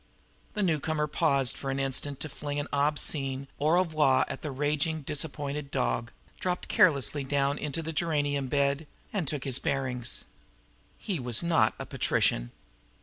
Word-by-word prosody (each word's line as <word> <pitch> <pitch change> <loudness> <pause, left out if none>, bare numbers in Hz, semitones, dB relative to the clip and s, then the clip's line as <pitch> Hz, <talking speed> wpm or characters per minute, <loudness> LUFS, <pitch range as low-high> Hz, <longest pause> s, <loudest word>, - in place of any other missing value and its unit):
The 210 - +1
newcomer 155 -3 +1
paused 140 -5 +1
an 135 0 -1
instant 135 +1 0
to - - -2
fling 145 +1 -4
an 145 - -3
obscene 140 -2 0
au 150 - +2
revoir 155 -6 +4
at - - -5
the 150 - -4
raging, 150 +3 0
disappointed 145 -1 -3
dog, 125 -3 0 0.3
dropped 180 -1 -2
carelessly 145 - +3
down 140 +1 +1
into 150 +2 -3
a 160 - -2
geranium 145 -4 0
bed, 140 +3 +1 0.3
and 190 -8 -1
took 145 -1 -1
his 135 -2 +1
bearings. 130 -3 -1 0.7
He 190 -7 -3
was 120 +2 +2
not 170 -1 +3
a - - -5
patrician. - - +1
145 Hz, 145 wpm, -29 LUFS, 135-155 Hz, 0.7 s, revoir